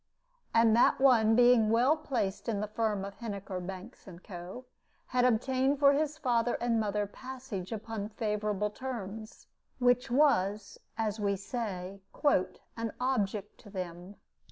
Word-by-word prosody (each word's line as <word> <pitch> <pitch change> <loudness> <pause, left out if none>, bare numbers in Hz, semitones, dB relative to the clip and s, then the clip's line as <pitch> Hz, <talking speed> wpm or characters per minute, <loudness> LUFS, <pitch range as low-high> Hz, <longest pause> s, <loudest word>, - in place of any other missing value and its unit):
And 225 -1 +5
that 235 - +4
one 230 -5 +5
being 240 -2 +5
well 245 +7 +4
placed 250 -10 -3
in 210 -3 -1
the 210 - -2
firm 210 -2 -1
of 200 - -9
Heniker, 200 -5 -5
Banks, 185 +2 -9
and 180 -1 -12
Co., 185 +6 -8 0.4
had 250 0 +2
obtained 260 +3 +2
for 280 0 +6
his 305 +1 0
father 240 -5 +1
and 235 -1 0
mother 210 -1 0
passage 250 -4 -7
upon 220 -1 -4
favorable 210 -1 -1
terms, 220 -3 -7 0.3
which 245 -1 +2
was, 215 -7 +2 0.2
as 220 -1 -1
we 200 -1 +1
say, 195 -3 -5 0.7
"an 230 -2 -3
object 210 -5 -1
to 210 - -14
them." 180 0 -7
220 Hz, 140 wpm, -31 LUFS, 200-245 Hz, 0.7 s, for